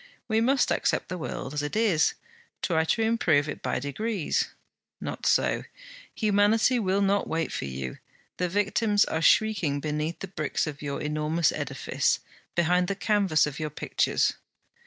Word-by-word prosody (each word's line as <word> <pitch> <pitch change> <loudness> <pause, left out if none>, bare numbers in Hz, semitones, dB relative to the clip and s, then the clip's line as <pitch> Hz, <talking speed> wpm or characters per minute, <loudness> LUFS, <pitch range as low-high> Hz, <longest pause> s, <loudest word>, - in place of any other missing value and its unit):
We 220 -1 +2
must 260 +3 +2
accept - - 0
the 185 - -3
world 155 - -5
as 150 - -1
it 145 +5 -4
is, 210 -8 +3 0.5
try 160 -2 +2
to 225 +7 +1
improve 170 -10 +2
it 145 - -5
by - - -1
degrees. 170 - -1 0.5
Not - - -4
so: - - +2 0.5
humanity 215 +3 +3
will 200 -1 +1
not 200 +1 +1
wait 165 0 -1
for - - -3
you, 65 -1 -5 0.4
the 180 -1 0
victims 205 +2 +2
are 160 - -2
shrieking 185 -8 +3
beneath 150 +2 -2
the 195 - -6
bricks 155 -5 -2
of 145 -2 -6
your 140 -1 -3
enormous 155 +2 +1
edifice, 135 -3 -1 0.4
behind 180 +1 +2
the 200 - -1
canvas 200 -5 +2
of 145 -2 -5
your 155 -1 -2
pictures. 150 - 0
175 Hz, 155 wpm, -27 LUFS, 150-205 Hz, 0.5 s, is